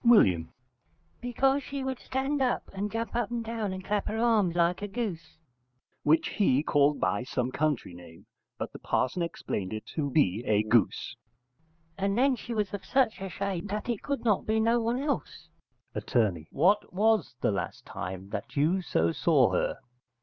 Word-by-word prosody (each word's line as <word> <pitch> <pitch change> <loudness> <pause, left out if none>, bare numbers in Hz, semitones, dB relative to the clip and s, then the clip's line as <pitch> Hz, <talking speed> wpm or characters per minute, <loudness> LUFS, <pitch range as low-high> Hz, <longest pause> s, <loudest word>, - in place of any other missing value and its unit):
W. 95 - +5 0.7
Because 265 +3 +2
she 275 -1 -5
would 265 -1 -3
stand 270 +2 -1
and 210 -5 -1
jump 230 +1 -3
up 240 -3 0
and 235 -1 -3
down 225 -3 -2
and 185 0 -6
clap 205 -1 -1
her 220 - -2
arms 220 -7 +3
like 175 +2 +2
a 205 - -2
goose 195 -7 -5 0.6
[which 155 +2 +3
he 145 -9 +2
called 145 -1 +3
by 95 +3 +1
some 125 0 -2
country 145 -10 -1
name: 85 -1 -13 0.3
but - - -5
the - - -9
parson 135 +8 0
explained 105 - -3
it 110 - -5
to 145 -3 -1
be 120 - +2
a 105 0 +3
goose]. 110 +1 +1 0.8
And 195 +2 0
then 265 +1 +4
she 240 - -8
was 210 -2 -1
of 200 - -4
such 250 -7 +1
a 195 - -4
shape 195 -1 -3
that 210 +4 -4
it 235 -4 -1
could 280 -3 -3
not 210 -4 +2
be 220 +1 +2
no 230 +2 +3
one 230 +2 0
else. 270 - -3 0.4
Att. - - -6 0.3
What 195 +8 +2
was 210 - +2
the - - +2
last 100 - -4
time 95 +2 -6
that 105 0 -5
you 165 +7 +3
so 85 - +1
saw - - +3
her? - - 0
195 Hz, 180 wpm, -29 LUFS, 140-230 Hz, 0.8 s, W